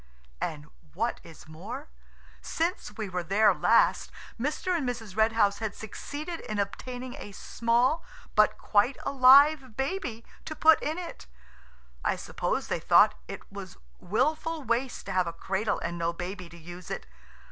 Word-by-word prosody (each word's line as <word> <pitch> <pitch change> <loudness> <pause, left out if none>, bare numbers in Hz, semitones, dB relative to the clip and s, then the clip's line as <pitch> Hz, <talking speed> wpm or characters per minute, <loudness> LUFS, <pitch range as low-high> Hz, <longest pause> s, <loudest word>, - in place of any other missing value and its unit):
And 150 -2 -3 0.3
what 230 +5 -1
is 160 -1 -14
more, 205 - -8 0.5
since 330 - -2
we 215 -2 -3
were 180 -1 -2
there 200 +5 +4
last - - +3 0.3
Mr. 300 +7 -1
and 285 -7 0
Mrs. 225 -6 -6
Red 220 +1 +3
House 200 -3 +2
had 220 -2 -3
succeeded 295 - -6
in 215 - -5
obtaining 245 +5 -4
a 205 - -9
small 240 +9 +1 0.3
but - - +4
quite 220 +6 +2
alive 275 -1 +6
baby 270 -6 -3 0.2
to 310 - -5
put 315 +1 +6
in 310 +3 -2
it. 350 - -7 0.8
I - - +1
suppose - - -2
they - - -1
thought - - +6
it - - -7
was - - -9 0.2
wilful 310 - 0
waste 240 +2 -1
to - - -5
have 185 -1 +1
a 170 - -3
cradle 195 +4 -1
and 170 0 -3
no 170 0 0
baby 180 +1 -6
to 170 - -13
use 175 +2 -10
it. - - -4
225 Hz, 160 wpm, -28 LUFS, 190-280 Hz, 0.8 s, alive